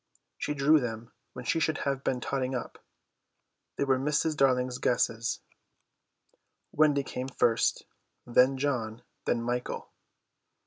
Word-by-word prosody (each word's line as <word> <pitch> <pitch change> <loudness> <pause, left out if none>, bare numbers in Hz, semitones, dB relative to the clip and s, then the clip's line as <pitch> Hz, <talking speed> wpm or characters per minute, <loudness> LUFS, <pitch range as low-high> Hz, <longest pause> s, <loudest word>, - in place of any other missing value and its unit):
She 150 - -2
drew 150 +3 +5
them 115 -2 -5 0.2
when 125 -1 -8
she 165 - +1
should 155 -1 +1
have 140 -1 -1
been 125 - 0
totting 130 0 -1
up. 125 - -5 1.0
They - - 0
were 135 -2 +2
Mrs. 150 +3 +1
Darling's 130 -2 +2
guesses. 115 -1 0 1.3
Wendy 145 -2 +3
came 130 -1 -5
first, 120 -3 +1 0.4
then 125 +2 +4
John, 120 -5 -2 0.2
then 115 -1 0
Michael. 120 +1 -3
130 Hz, 125 wpm, -29 LUFS, 120-140 Hz, 1.3 s, drew